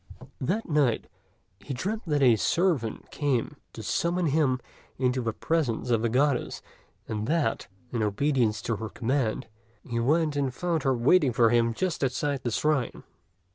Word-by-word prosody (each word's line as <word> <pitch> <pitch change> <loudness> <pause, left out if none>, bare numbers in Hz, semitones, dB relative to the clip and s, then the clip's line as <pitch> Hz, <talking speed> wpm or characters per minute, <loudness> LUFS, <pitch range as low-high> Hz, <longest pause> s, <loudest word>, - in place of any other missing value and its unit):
That 185 - -1
night 145 -7 +2 0.5
he 115 +7 -6
dreamt 205 - -3
that 145 -3 +2
a 120 -3 +6
servant 155 - 0
came 140 -5 -1 0.2
to - - -8
summon 175 +1 0
him 140 -4 +2 0.4
into 130 0 +1
the 115 -1 -1
presence 125 -2 -1
of 115 -2 +3
the 115 - +1
Goddess; 130 +2 0 0.4
and 110 0 -3
that, 150 -7 0 0.2
in 120 - -1
obedience 110 0 +1
to 115 - -1
her 110 0 -5
command, 120 -1 -1 0.4
he 115 -1 -2
went 150 +5 +2
and 140 -2 0
found 165 +4 -1
her 135 -2 +2
waiting 135 +2 +4
for 115 -1 +4
him 115 -1 +2
just 180 -2 -1
outside 135 +1 -1
the 120 - -2
shrine. 140 +1 0
130 Hz, 160 wpm, -27 LUFS, 115-155 Hz, 0.5 s, a